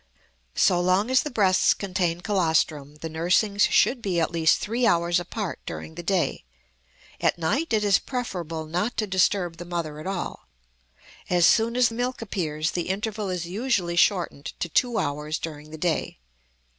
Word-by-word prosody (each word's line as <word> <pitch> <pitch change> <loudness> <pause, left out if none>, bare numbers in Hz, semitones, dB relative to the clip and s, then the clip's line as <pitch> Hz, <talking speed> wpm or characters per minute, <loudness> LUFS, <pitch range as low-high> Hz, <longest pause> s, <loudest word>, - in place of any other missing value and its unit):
So 180 -2 +3
long 185 +6 +2
as 260 - +5
the 300 - -4
breasts 195 -7 +3
contain 180 -3 -1
colostrum 160 -6 0
the 165 - -3
nursings 180 +6 +1
should 250 -2 +3
be 185 -5 0
at 165 - 0
least 165 -2 +3
three 235 +3 0
hours 170 -3 +2
apart 195 +1 -5
during 160 - -6
the 175 - -7
day; 180 0 0 0.8
at - - +1
night 270 - -1
it 215 -2 +2
is 200 -1 +4
preferable 175 - -4
not 180 +9 -2
to 220 - +1
disturb 185 -3 +1
the 175 - -7
mother 170 -4 -4
at 155 - -7
all. 195 -2 -4 0.8
As 175 -2 +4
soon 230 +5 +3
as 245 -2 +4
milk 245 +2 -2
appears 160 -8 -2
the 175 0 -3
interval 210 +1 -2
is 180 -2 -3
usually 190 -2 -1
shortened 175 -5 +1
to - - -1
two 240 +7 +1
hours 150 +1 -2
during 150 -2 -7
the 160 - -8
day. 165 0 -1
180 Hz, 170 wpm, -25 LUFS, 165-210 Hz, 0.8 s, as